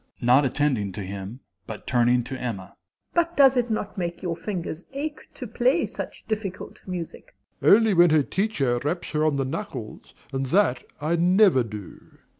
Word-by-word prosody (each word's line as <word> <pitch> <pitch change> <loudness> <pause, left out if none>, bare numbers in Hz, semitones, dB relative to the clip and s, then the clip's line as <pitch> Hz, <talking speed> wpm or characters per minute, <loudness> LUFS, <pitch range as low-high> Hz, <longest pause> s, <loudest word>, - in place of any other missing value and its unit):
MRS. - - -40 0.2
S. - - -4
(not 130 +4 +5
attending 130 -7 0
to 100 - -6
him, 100 +5 -7 0.3
but 110 - -8
turning 120 0 +3
to 130 - -6
Emma). 110 -8 -5 0.4
But 340 0 +1
does 270 -2 +7
it 245 -1 +1
not 210 -2 -3
make 170 0 -4
your 170 -2 -1
fingers 175 -2 -5
ache 295 +2 -5
to - - -7
play - - +1
such - - -8
difficult 205 -4 -5
music? 180 -3 -7 0.3
DOMINIE. 200 - +7
Only 225 -2 +2
when 175 -1 +6
her 155 -2 +4
teacher 140 - 0
raps 175 +5 -3
her 155 -1 0
on 155 -2 +2
the 135 - 0
knuckles, 130 - -6 0.2
and 135 0 -1
that 155 -5 +2 0.2
I 160 +3 0
never 180 -3 +5
do. 105 -4 -9
155 Hz, 185 wpm, -25 LUFS, 125-200 Hz, 0.4 s, does